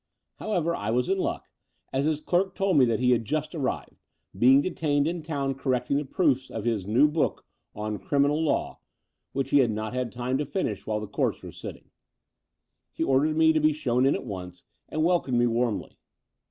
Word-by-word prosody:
However, 170 -5 -1
I 105 - -4
was 125 +2 +1
in 195 0 +1
luck, - - -2 0.5
as 135 +2 +1
his 155 -1 0
clerk 185 +4 0
told 195 -4 +1
me 130 - +6
that 115 -2 0
he 125 0 +3
had 120 -2 +2
just 155 - -2
arrived, 140 -6 -4 0.3
being 130 +7 +6
detained 145 -5 0
in 170 0 -2
town 140 -4 -2
cor 130 0 -1
recting 125 +3 0
the 145 - -2
proofs 135 -4 +1
of 110 -1 -5
his 110 -5 -1
new 120 +8 +5
book 150 0 -1 0.3
on 105 0 -4
Criminal 145 +2 +1
Law," 155 - -1 0.5
which 135 0 -2
he 145 - +6
had 125 -4 +4
not 110 +1 -3
had 125 -2 -2
time 125 +3 -2
to 150 - -1
finish 115 - -3
while 105 -1 0
the - - -4
Courts 105 - -2
were - - -8
sitting. - - -10 1.0
He - - -2
ordered 150 +2 +2
me 160 0 +5
to 155 - +2
be 155 0 +3
shown 130 -3 +1
in 140 - +3
at - - -5
once 90 -4 -7 0.3
and 155 - -1
wel 175 +1 +4
comed 125 -3 -1
me 120 - +4
warmly. 120 -2 -1
135 Hz, 205 wpm, -26 LUFS, 120-155 Hz, 1.0 s, me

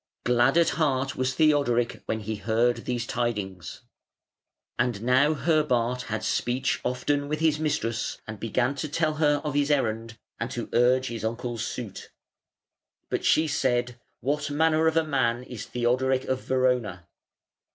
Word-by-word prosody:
Glad 125 +4 +3
at 170 -1 +5
heart 135 -2 +1
was 130 0 0
Theodork 140 -7 +2
when 110 - -2
he 110 +1 -4
heard 115 +4 +1
these 120 -1 -2
tidings. 105 -8 -3 1.0
And 120 -3 0
now 130 +5 +4
Herbart 125 -6 +1
had 110 -1 -2
speech 130 +2 0
often 145 +3 -1
with 155 +1 -2
his 155 -1 +2
mistress, 120 -7 -1
and 110 -2 -8
began 120 +4 0
to 155 - -3
tell 155 +1 0
her 150 -2 +3
of 150 -2 -2
his 145 0 +1
errand 115 -5 0 0.2
and - - -2
to - - -5
urge 130 +2 +3
his 115 -3 -5
uncle's 115 0 -3
suit. 115 -4 -6 1.0
But - - -2
she 160 +1 +3
said, 125 -3 0 0.2
"What 145 +3 -1
manner 160 +2 +2
of 160 0 +2
man 125 -4 +1
is 125 -4 -8
Theodoric 130 +2 +1
of 130 0 -1
Verona?" 125 -9 0
125 Hz, 150 wpm, -26 LUFS, 115-145 Hz, 1.0 s, at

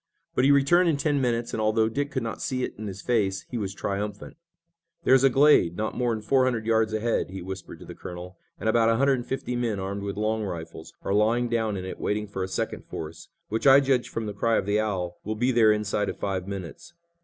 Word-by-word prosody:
But 125 - +2
he 140 - +6
returned 170 +6 +4
in 155 - +1
ten 145 0 +1
minutes, 120 -2 -1
and, 110 - -1
although 110 +1 +2
Dick 140 +6 -2
could 130 -4 -3
not 115 - -5
see 130 -1 -2
it - - -3
in 110 0 -6
his 100 0 -7
face, 100 -6 0
he 125 - -2
was 100 -3 -3
triumphant. 100 +1 -4 0.7
"There's 130 0 +5
a 135 - +7
glade 135 - +4
not 110 0 -2
more'n 120 -3 0
four 130 +4 +3
hundred 115 -4 -1
yards 110 -1 +2
ahead," 110 -1 0
he 95 +1 -6
whispered 95 0 -7
to - - -12
the - - -9
colonel, 90 +1 -8 0.2
"and - - -3
about 115 0 +4
a 115 - +3
hundred 135 +1 +3
and 120 - -8
fifty 130 -2 -3
men, 115 -4 -1
armed 100 +1 -4
with 100 0 -4
long 110 +1 0
rifles, 85 -4 -7
are 95 - -1
lying 115 +4 +2
down 110 -3 0
in 95 - -5
it 95 - -7
waiting 105 +1 -1
for 100 -2 -6
a 95 - -1
second 95 - -3
force, 80 +1 -7 0.2
which 110 +6 0
I 135 +1 +9
judge 135 -3 +1
from 115 - -4
the 105 - -4
cry 115 +3 +1
of - - -1
the 105 +1 +1
owl 90 -5 -2
will 110 +1 -3
be 125 +4 +1
there 115 -3 +5
inside 105 -1 0
of - - -5
five 95 -2 -3
minutes." 100 - -7
110 Hz, 245 wpm, -26 LUFS, 100-125 Hz, 0.7 s, I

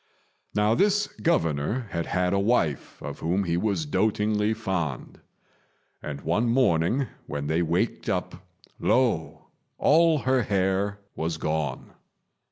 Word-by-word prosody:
Now 105 +1 +3
this 205 - +3
Governor 105 - 0
had 85 -1 -2
had 90 0 0
a 100 - +2
wife 100 - 0
of - - -6
whom 90 +5 0
he 85 -2 -1
was 105 - 0
dotingly 105 -5 +1
fond; 90 - -3 0.8
and 70 -2 -6
one 105 +9 +1
morning 120 0 +2 0.2
when 70 0 -4
they 80 +3 +1
waked 85 +1 -1
up, - - -3 0.4
lo! 120 -11 0 0.3
all 165 +1 +4
her 130 -2 +2
hair 100 -1 0 0.2
was 80 0 -2
gone. 75 -4 -3
100 Hz, 125 wpm, -26 LUFS, 80-120 Hz, 0.8 s, all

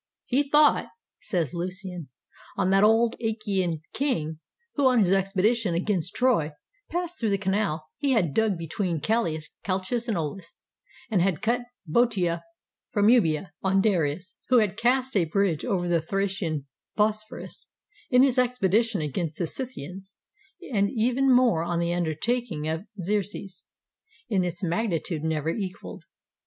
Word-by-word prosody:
"He 265 +3 +2
thought," 295 +1 +4 0.3
says 170 - -1
Lucian, 180 -2 -5 0.5
"on 190 -1 +2
that 195 +1 +5
old 225 +2 +4
Achaean 195 -7 -1
king 160 - -1 0.3
who, 285 -3 +3
on 255 -1 +4
his 185 -2 +3
expedition 195 +1 +1
against 180 -1 -1
Troy, 225 -13 +2 0.4
passed 350 0 -3
through 225 - +1
the 200 - +2
canal 190 -5 -1
he 280 -2 +1
had 175 - +1
dug 220 -4 +2
between 165 +1 -2
Chalcis 160 -4 0 0.6
and 220 -5 0
Auhs, 165 +3 -5 0.5
and 195 -5 +3
had 180 -4 0
cut 240 +2 +1 0.2
Boeotia 180 -2 +1 0.5
from 205 0 +3
Euboea; 175 -7 +3
on 195 0 +2
Darius, 180 -3 0 0.2
who 255 - +6
had 210 -4 +2
cast 255 +3 +1
a 185 -4 +3
bridge 175 -1 0
over 190 -7 0
the 170 -2 +2
Thracian 185 -4 -2 0.3
Bosphorus, 215 0 -2 0.4
in 250 0 +6
his 260 -2 +3
expedition 225 -4 +2
against 155 +2 -3
the 175 - 0
Scythians; 190 - -7 0.6
and 200 -2 +2
even 250 +3 +2
more 245 -10 +4
on 170 0 -1
the 170 0 0
undertaking 175 +1 -1
of 160 +5 -3
Xerxes, 195 -1 -3 0.6
in 195 -5 +2
its 175 +1 -4
magnitude 170 -4 -1
never 160 -1 -1
equaled. 195 +1 -5
195 Hz, 140 wpm, -26 LUFS, 170-230 Hz, 0.6 s, who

